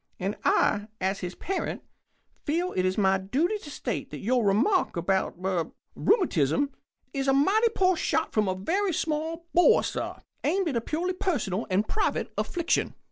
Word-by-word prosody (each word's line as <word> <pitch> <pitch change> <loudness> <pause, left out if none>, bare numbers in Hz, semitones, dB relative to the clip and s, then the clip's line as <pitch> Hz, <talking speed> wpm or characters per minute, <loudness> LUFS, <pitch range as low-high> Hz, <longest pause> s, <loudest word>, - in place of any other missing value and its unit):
And 195 +3 -2
I, 205 0 +2
as 190 +1 -1
his 180 -1 -5
parent, 390 - -3 0.6
feel 345 +5 0
it 185 0 0
my 190 -2 +3
duty 300 - 0
to 300 - -10
state - - -4
that - - -7
your 245 +3 +1
remark 215 - +2
about 190 +3 0
er 180 -4 0 0.3
rheumatism 280 - +2 0.4
is 275 0 -1
a 270 - +4
mighty 400 +12 +4
poor 370 -1 +3
shot 320 0 0
from 215 -2 +2
a 185 - 0
very 360 - 0
small 320 +2 -2
bore, 355 - +5
sir, - - -3 0.3
aimed 365 +3 +1
at 270 - -3
a 230 - +1
purely 340 +9 -2
personal 240 - -1
and 195 +3 +1
private 425 - -1
affliction." 345 -2 0
275 Hz, 165 wpm, -27 LUFS, -, 0.6 s, bore